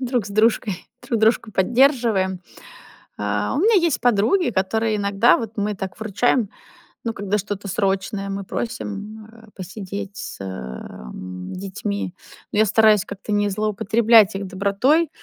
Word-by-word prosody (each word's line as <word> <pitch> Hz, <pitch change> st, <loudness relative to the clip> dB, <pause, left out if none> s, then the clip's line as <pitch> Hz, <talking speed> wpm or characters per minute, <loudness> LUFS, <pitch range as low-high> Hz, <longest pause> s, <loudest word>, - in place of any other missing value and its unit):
друг 250 Hz, -3 st, 0 dB
с -, -, -8 dB
дружкой, 215 Hz, -2 st, +1 dB, 0.2 s
друг 230 Hz, -3 st, 0 dB
дружку 220 Hz, 0 st, +2 dB
поддерживаем. 225 Hz, -4 st, +2 dB, 0.8 s
А, 105 Hz, 0 st, -1 dB
у -, -, +1 dB
меня 445 Hz, +3 st, +5 dB
есть 335 Hz, -5 st, +1 dB
подруги, 245 Hz, -, +3 dB
которые 215 Hz, +2 st, 0 dB
иногда, 200 Hz, +3 st, +4 dB
вот 225 Hz, -2 st, -5 dB
мы 210 Hz, 0 st, -1 dB
так 190 Hz, -1 st, -6 dB
выручаем, 220 Hz, +1 st, +1 dB, 0.5 s
ну, 230 Hz, -, -1 dB
когда 205 Hz, 0 st, -1 dB
что-то 205 Hz, 0 st, -5 dB
срочное, 195 Hz, 0 st, -1 dB
мы 195 Hz, 0 st, -4 dB
просим, 215 Hz, -1 st, -5 dB
а, 225 Hz, -1 st, -17 dB
посидеть 200 Hz, +1 st, -7 dB
с, -, -, -7 dB
эм, 90 Hz, +2 st, -7 dB
детьми. 195 Hz, 0 st, -4 dB, 0.4 s
Но 210 Hz, -, +1 dB
я 215 Hz, -, +6 dB
стараюсь 215 Hz, -1 st, +5 dB
как-то 200 Hz, +1 st, -6 dB
не 205 Hz, 0 st, +2 dB
злоупотреблять 215 Hz, +1 st, +4 dB
их 195 Hz, 0 st, -4 dB
добротой, 200 Hz, -, +2 dB
205 Hz, 140 wpm, -22 LUFS, 195-225 Hz, 0.8 s, я